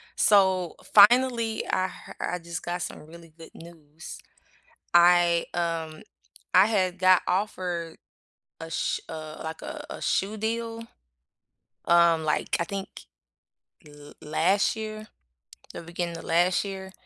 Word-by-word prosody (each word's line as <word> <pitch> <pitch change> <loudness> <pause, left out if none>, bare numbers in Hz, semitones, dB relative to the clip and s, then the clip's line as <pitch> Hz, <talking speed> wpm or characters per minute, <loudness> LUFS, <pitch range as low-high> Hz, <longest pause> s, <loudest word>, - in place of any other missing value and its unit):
so, 190 -4 +3 0.2
finally, 230 +1 +5
I 185 0 0
her 185 - -12
I 180 - -3
just 170 -1 -7
got 175 +1 -4
some - - -6
really 165 0 -15
good 165 - -13
news. 160 -2 -12 0.8
I, 175 -1 +5
um, 165 -2 -3 0.5
I 190 +3 +7
had 185 -4 0
got 185 0 +5
offered 180 -4 -2 0.6
a 165 - -8
sh 160 - -2
uh, 155 -1 -8
like, 160 0 -7
a 300 -1 -7
a - - -8
shoe 200 +3 -1
deal, 230 +1 -3 1.0
um, 170 -2 +4
like, 150 - 0
I - - +1
think, 195 +2 -6 1.0
l 145 0 -14
last 190 +8 +1
year 215 0 -7 0.7
the - - -7
beginning 170 0 -5
of - - -11
last 175 +4 +2
year, 190 -1 -7
175 Hz, 130 wpm, -26 LUFS, 165-200 Hz, 1.0 s, I